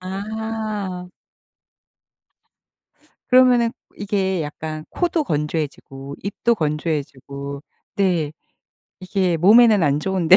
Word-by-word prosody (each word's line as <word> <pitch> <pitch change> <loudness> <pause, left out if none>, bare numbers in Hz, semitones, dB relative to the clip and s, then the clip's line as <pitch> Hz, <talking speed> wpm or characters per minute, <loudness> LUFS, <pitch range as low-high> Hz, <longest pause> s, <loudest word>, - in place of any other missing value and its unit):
아. 205 -1 -4 2.2
그러면은 250 -2 +5 0.2
이게 190 -4 -1
약간 155 +1 -6
코도 340 -3 0
건조해지고 145 - -3
입도 230 +4 0
건조해지고 140 - -3 0.3
네 175 -7 +1 0.7
이게 185 -2 0
몸에는 210 +3 +6
안 145 -1 +2
좋은데 185 0 +4
185 Hz, 190 characters per minute, -21 LUFS, 150-210 Hz, 2.2 s, 몸에는